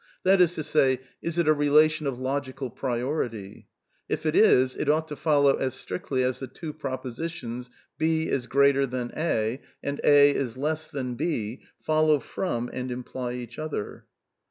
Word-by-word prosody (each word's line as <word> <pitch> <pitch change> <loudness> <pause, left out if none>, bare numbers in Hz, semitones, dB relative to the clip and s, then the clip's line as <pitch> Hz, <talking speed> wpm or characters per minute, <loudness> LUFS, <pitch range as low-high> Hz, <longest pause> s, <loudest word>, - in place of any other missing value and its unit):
That 190 0 +5
is 175 0 +4
to 155 - -3
say: 135 -4 +2 0.2
Is 170 0 -3
it 170 -2 +2
a 155 - +6
relation 150 +1 +3
of 130 -3 -3
logical 130 -1 -3
priority? 120 -5 -3 0.4
If - - -2
it 155 - +1
is, 130 -11 +5
it 145 - -2
ought 155 +1 +2
to 150 - -5
follow 145 -2 +3
as 130 -1 -2
strictly 130 -3 -2
as 125 0 -1
the 130 - -5
two 155 +1 -7
propositions: 130 -2 -5 0.2
" - - -48
B 160 0 +1
is 125 -3 -1
greater 140 0 +4
than 125 -1 -4
A,'' 125 -6 0 0.2
and 140 0 -3
" - - -18
A 145 -1 +7
is 130 -4 -2
less 155 +3 -2
than 130 -5 -4
B 120 -4 -2
" - - -43
follow 155 -1 +4
from 125 -5 -3
and 130 0 -4
imply 125 0 -4
each 120 0 -7
other. 155 -9 -5
140 Hz, 180 wpm, -26 LUFS, 125-155 Hz, 0.4 s, A